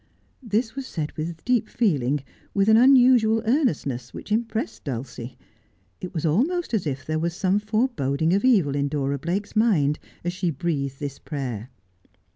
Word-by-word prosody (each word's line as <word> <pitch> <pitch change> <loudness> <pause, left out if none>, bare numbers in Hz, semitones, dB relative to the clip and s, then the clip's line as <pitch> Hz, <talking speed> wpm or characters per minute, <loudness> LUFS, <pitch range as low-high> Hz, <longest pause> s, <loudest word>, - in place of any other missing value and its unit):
This 225 0 -1
was 270 -1 -5
said 155 -3 -4
with 160 +1 -6
deep 245 -3 +1
feeling, 145 - +1 0.3
with 200 +1 +3
an 220 - +7
unusual 245 -3 +5
earnest 255 - +2
ness, 125 -2 -5
which - - -9
impressed 225 +1 -2
Dulcie. 125 -2 -6 0.6
It 180 - -6
was 165 -2 -3
almost 275 - +1
as 195 -7 0
if 135 -2 -4
there 155 0 -1
was 170 +1 -2
some 190 +2 +1
foreboding 210 - 0
of 200 - +2
evil 195 - +3
in 140 0 +1
Dora 140 -1 -1
Blake's 190 - -3
mind 170 -10 +3 0.2
as 175 0 -2
she 185 -1 -1
breathed 140 -3 -2
this 140 -1 -5
prayer. 125 -6 -5
170 Hz, 165 wpm, -24 LUFS, 140-220 Hz, 0.6 s, an